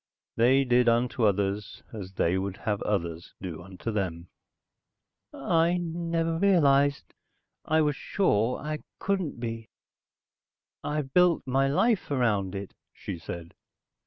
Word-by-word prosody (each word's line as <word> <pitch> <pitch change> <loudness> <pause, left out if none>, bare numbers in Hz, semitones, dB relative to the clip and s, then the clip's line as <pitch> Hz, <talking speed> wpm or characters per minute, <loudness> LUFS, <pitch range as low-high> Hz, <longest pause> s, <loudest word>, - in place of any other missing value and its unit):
They 130 +4 +4
did 125 -1 +4
unto 120 0 +1
others, 100 +1 -1
as 95 -3 -7
they 90 -1 +1
would 95 0 -2
have 105 -2 -2
others 85 -4 -3
do 85 -4 -6
unto 95 +5 -6
them." 90 -5 -3 1.0
"I 165 +5 +1
never 165 -1 -1
realized 145 -7 +3 0.5
I 160 +1 +3
was 150 -2 +1
sure 125 - +1
I 155 +1 -4 0.2
couldn't 190 -10 -2
be.... 115 -1 -5 1.1
I've 150 -3 -3
built 180 -2 +4
my 135 +1 +2
life 210 - +2
around 105 -8 +1
it," 100 0 -6 0.2
she 85 - -6
said. 85 +1 -7
125 Hz, 125 wpm, -27 LUFS, 100-155 Hz, 1.1 s, They